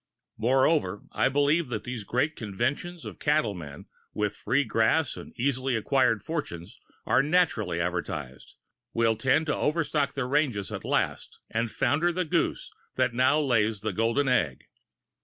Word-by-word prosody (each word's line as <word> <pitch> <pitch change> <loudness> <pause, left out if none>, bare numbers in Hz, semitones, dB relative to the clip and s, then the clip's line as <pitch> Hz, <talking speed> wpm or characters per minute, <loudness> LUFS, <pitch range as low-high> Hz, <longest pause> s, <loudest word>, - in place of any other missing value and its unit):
Moreover, 130 - +2
I - - +2
believe 145 +4 +2
that 115 -4 -4
these 125 -3 -5
great 130 +9 0
conventions 130 - -3
of - - -8
cattlemen, 100 - -1 0.3
where 105 -1 0
free 125 +7 0
grass 115 +6 +1
and - - -10
easily 130 0 0
acquired 115 -1 +2
fortunes 140 - -5 0.3
are 130 - +4
naturally 140 - +1
advertised, 85 -6 -4 0.4
will 115 -1 +3
tend 135 +7 +2
to 150 - 0
overstock 150 -3 0
the 135 -2 -2
ranges 125 - 0
at - - -5
last - - -1
and 115 +1 0
founder 160 +9 +1
the 180 +1 -1
goose 155 - -1 0.2
that - - +1
now 130 +5 +3
lays 115 -7 +1
the 110 -2 -2
golden 115 +7 +1
egg. 85 - +1
125 Hz, 145 wpm, -27 LUFS, 105-145 Hz, 0.4 s, are